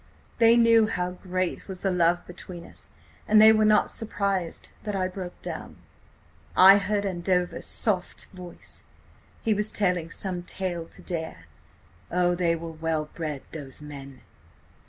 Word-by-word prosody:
They 230 0 +6
knew 230 -2 +5
how 180 -3 -2
great 185 0 -3
was 190 -2 -6
the 195 - 0
love 175 -1 +2
between 175 -1 -9
us, - - -11 0.4
and 215 0 +6
they 220 +1 +9
were 215 0 +3
not 210 -1 +4
surprised 200 -5 -2
that 210 -2 -4
I 185 -1 0
broke 185 -1 -7
down. - - -6 0.8
"I 195 +2 +9
heard 205 0 -1
Andover's 180 -1 -1
soft 190 -5 0
voice... 180 -2 -10 0.6
he 220 - +2
was 210 +1 -1
telling 180 -5 +1
some 180 +1 -3
tale 175 -2 -3
to - - -10
Dare. 160 - -5 0.6
Oh, 175 0 +2
they 170 -1 +1
were 165 0 -6
well 160 -1 -2
bred 155 -5 -4
those 140 -4 -4
men! 140 -3 -10
180 Hz, 150 wpm, -26 LUFS, 170-200 Hz, 0.8 s, they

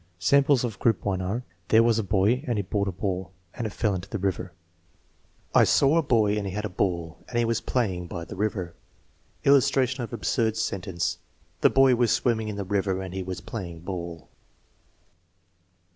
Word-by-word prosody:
Samples 140 +6 +3
of 115 -4 -4
group 115 -4 +1
1 95 -2 0
are: 100 +7 -2 0.2
"There 110 +1 +5
was 115 -1 +3
a - - 0
boy, 105 +6 +2
and 120 -3 0
he 100 - 0
bought 100 +2 -1
a - - 0
ball, 95 -1 -3 0.2
and 115 - -3
it - - -4
fell 105 0 0
into 95 +1 -5
the 110 - -3
river/* 95 -2 -2 1.0
"I - - +7
saw 140 +3 +4
a 165 - +4
boy, 110 -7 +2
and 100 -1 -2
he 95 - -5
had 105 +1 -3
a - - -3
ball, 85 -3 -2
and 120 - -3
he 120 - +3
was 115 -1 0
play 120 -7 0
ing 90 -1 -6
by 85 -1 -6
the 80 - -8
river." 95 -4 -2 0.7
Illustration 130 -2 +3
of 115 - -5
an - - -3
absurd 110 0 0
sentence, 95 -5 -2 0.4
"The - - +5
boy 135 -1 +5
was 120 -1 +2
swimming 110 -3 +1
in 105 - -4
the 100 - -3
river 95 -1 0
and 95 -1 -6
he 95 - -3
was 95 0 -5
playing 85 -7 -7
ball." 85 -3 -6
100 Hz, 205 wpm, -26 LUFS, 95-115 Hz, 1.0 s, I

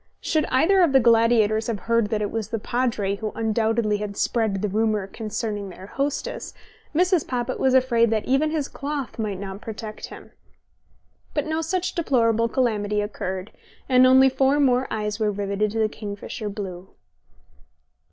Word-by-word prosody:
Should 310 -2 0
either 370 +9 +3
of 330 -6 +3
the 265 - +7
gladiators 225 -2 +3
have 225 -4 -3
heard 230 -2 +1
that 210 -1 -1
it 205 - -3
was 225 -2 -3
the 225 - -3
Padre 220 -4 -1
who 215 0 -4
undoubtedly 220 -1 +1
had 205 -1 -5
spread 215 -4 0
the - - +2
rumour 215 0 0
concerning 210 -1 -4
their 185 +1 -11
hostess, 285 - -3 0.4
Mrs. 360 0 +2
Poppit 250 0 -2
was 265 -1 +3
afraid 240 -3 +4
that 220 -1 0
even 275 +4 +2
his 305 -3 -1
cloth 280 -4 -5
might 205 -4 -2
not 195 0 -7
protect 215 -1 -7
him. - - -12 1.0
But 295 - 0
no 315 +1 -1
such 360 +3 -1
deplorable 230 -8 +2
calamity 210 -5 0
occurred, 190 -2 -4 0.4
and 255 -1 +6
only 260 +1 +7
four 270 +2 +2
more 260 -2 +3
eyes 210 0 -3
were 215 -1 +1
riveted 200 +1 -1
to - - -3
the 220 -1 +3
kingfisher 210 0 -6
blue. 190 -3 -7
225 Hz, 165 wpm, -24 LUFS, 210-260 Hz, 1.0 s, the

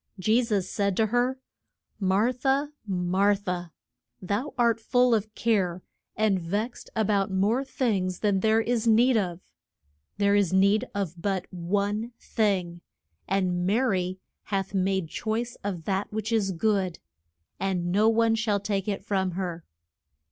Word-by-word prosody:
Je 215 +6 +3
sus 205 -5 0
said 200 -2 -1
to 225 - +4
her, 245 +4 +1 0.6
Mar 200 +5 +2
tha, 270 +3 0 0.2
Mar 190 +2 +2
tha, 180 -4 -4 0.5
thou 205 +10 -2
art 235 -2 +3
full 245 +1 +3
of 215 -1 0
care 185 -6 0 0.3
and 210 -3 +2
vexed 205 +8 -3
a 220 -1 +2
bout 200 -1 +1
more 205 +7 +1
things 200 -9 -1
than 205 -3 +2
there 220 +2 +3
is 235 0 0
need 235 +3 +5
of. 180 -5 -1 0.8
There 200 0 +3
is 200 -4 +3
need 200 +5 +3
of 180 -4 -3
but 195 -2 -1
one 205 +6 -1
thing, 185 -6 -1 0.5
and 180 -2 0
Ma 205 +4 +3
ry 185 -7 0 0.3
hath 195 -1 -2
made 190 -2 0
choice 230 +7 -3
of 190 -5 -3
that 195 +3 -2
which 215 +1 -3
is 210 -4 +1
good, 190 -1 0 0.6
and 180 -3 -1
no 210 +4 +4
one 225 0 +3
shall 220 -2 +1
take 200 -1 -2
it 200 -1 -3
from 190 -3 0
her. 175 -2 -4
200 Hz, 150 wpm, -27 LUFS, 185-225 Hz, 0.8 s, need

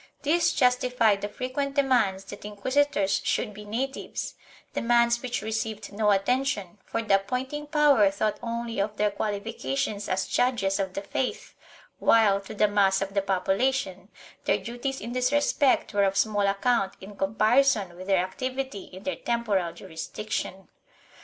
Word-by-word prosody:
This 330 +4 +3
justified 250 -5 +2
the 205 - -3
frequent 270 +4 -3
demands 240 -9 +2
that 195 - -10
inquisitors 210 0 +1
should 210 - -1
be 210 +1 -10
natives 255 +6 -4 0.2
— - - -26
demands 235 0 +3
which 245 -4 -3
received 220 -2 -3
no 210 0 +1
attention, 205 -2 0
for 230 - -3
the 200 -3 +4
appointing 260 +9 -4
power 290 -9 +5
thought 205 +2 -1
only 235 -1 -3
of 210 +1 -3
their 210 0 +2
qualifications 200 - -3
as 190 0 0
judges 215 -6 +1
of 190 -1 -2
the 195 - -3
faith 250 +5 -3 0.5
while, 205 -3 +4
to 195 - -9
the 210 - +4
mass 195 -2 +3
of 195 0 -7
the 200 - +2
population, 195 +1 0 0.4
their - - +3
duties 245 +3 -4
in 235 +3 -5
this 250 +1 +1
respect 290 -1 +2
were 200 -1 +3
of 195 0 0
small 205 -2 +2
account 200 +1 +1
in 200 +2 -11
comparison 215 0 +2
with 185 +2 -9
their 190 -2 +3
activity 255 0 -4
in 185 +1 -12
their 280 - -2
temporal 210 -7 0
jurisdiction. 190 +4 -5
215 Hz, 155 wpm, -27 LUFS, 195-250 Hz, 0.5 s, power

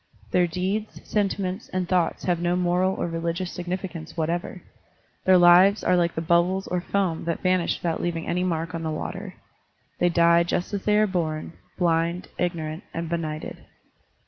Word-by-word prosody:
Their 180 -1 +3
deeds, 190 +5 -3
sentiments, 195 -1 -1
and 185 -1 -2
thoughts 180 -2 +1
have 175 -2 +1
no 175 0 +1
moral 180 +1 +1
or - - -2
religious 170 +2 -3
significance 180 -2 -5
whatever. 170 +3 -2 0.6
Their 185 -1 +7
lives 180 +4 +6
are 180 - +3
like 170 -1 +1
the 160 - -1
bubbles 175 +3 +2
or 180 -1 -2
foam 185 -4 -1
that 170 -1 -2
vanish 185 -2 +2
without 165 -2 -2
leaving 165 -1 -2
any 180 +1 0
mark 165 -2 -2
on 165 - -3
the 160 - -2
water. 190 +5 -5 0.6
They 175 - +3
die 170 0 +5
just 175 +3 -2
as 200 - -3
they 210 0 +4
are 215 - +5
bom, 165 -5 -2 0.2
blind, 170 0 0
ignorant, 160 -3 -2
and 165 0 -3
benighted. 155 -2 -4
175 Hz, 170 wpm, -25 LUFS, 165-185 Hz, 0.6 s, Their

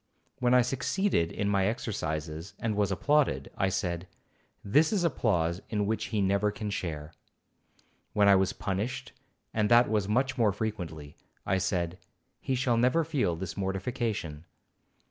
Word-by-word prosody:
When 125 0 +3
I 125 - +6
succeeded 135 - 0
in 100 - -2
my 100 -1 +2
exercises, 80 -6 -3
and 110 -2 -2
was 100 -1 +1
applauded, 135 - +1
I 95 - +1
said, 90 -2 -2 0.6
'This 150 +11 +4
is 200 -5 +1
applause 90 - +1
in 105 -2 0
which 110 +2 -1
he 105 -3 0
never 100 +2 +2
can 105 0 -4
share.' 80 -5 -4 1.0
When 105 -1 +4
I 100 - +8
was 95 0 +2
punished, 120 +7 -3 0.4
and 105 -1 +1
that 120 +1 +6
was 105 -3 +1
much 130 +5 +1
more 105 -4 +4
frequently, 85 -9 -5 0.3
I 95 0 +1
said, 90 -1 -1 0.4
'He 130 - -1
shall 125 -2 +1
never 125 +8 +3
feel 145 - 0
this 95 +2 -5
mortification.' 95 - -3
100 Hz, 150 wpm, -29 LUFS, 90-120 Hz, 1.0 s, I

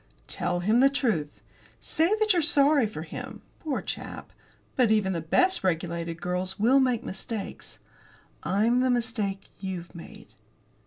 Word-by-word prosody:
"Tell 175 - -2
him 215 +6 +3
the 270 +2 +6
truth. 160 - -1 0.4
Say 320 - +1
that 430 -1 +4
you're 350 - +2
sorry 290 -5 +4
for 160 -7 -7
him, 165 - -8 0.2
poor 300 -5 -3
chap, - - -6 0.4
but 250 -4 +3
even 210 -3 +2
the 165 - -2
best 365 - +2
regulated 170 -1 -2
girls 180 +2 -2
will 250 +6 +5
make 255 -4 +1
mistakes. 200 +2 -6 0.6
I'm 225 +6 +2
the 255 0 +2
mistake 225 -5 -1
you've 185 -3 -6
made." 170 - -12
215 Hz, 145 wpm, -27 LUFS, 175-260 Hz, 0.6 s, the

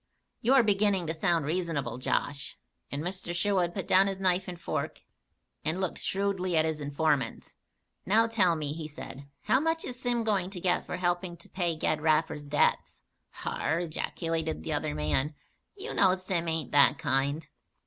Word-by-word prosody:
You 255 +4 +4
are 260 - +7
beginning 200 -3 +2
to 160 - -1
sound 165 -2 +1
reasonable, 155 -7 -2
Josh," 140 +2 -1 0.3
and 140 +2 -3
Mr. 180 -1 -4
Sherwood 180 -2 +1
put 195 - -3
down 190 +1 +5
his 195 -1 -2
knife 185 0 +2
and 175 -2 -6
fork 170 - -3 0.6
and 160 +4 0
looked 190 -3 -2
shrewdly 190 -3 0
at 160 - +4
his 160 -1 -2
informant. 145 -3 -1 0.5
"Now 220 +4 +4
tell 205 -7 +3
me," 150 -2 -3
he 155 -1 -5
said, 140 -2 -9
"how 260 - +3
much 325 +2 0
is 245 -1 -6
Sim 240 -2 0
going 200 -5 +1
to 190 -2 -6
get 180 0 +1
for - - -3
helping 175 0 -1
to - - -12
pay 175 -3 -1
Ged 155 -1 0
Raffer's 155 -1 +1
debts?" 145 +1 +1 0.3
"Har!" 160 +3 -2
ejaculated 165 - -2
the - - -2
other 75 - -1
man. 105 - 0 0.4
"You 415 +3 -6
know 190 -2 +4
Sim 185 -2 -2
ain't 160 -1 0
that 145 0 +6
kind." 140 +4 0
175 Hz, 175 wpm, -29 LUFS, 155-190 Hz, 0.6 s, are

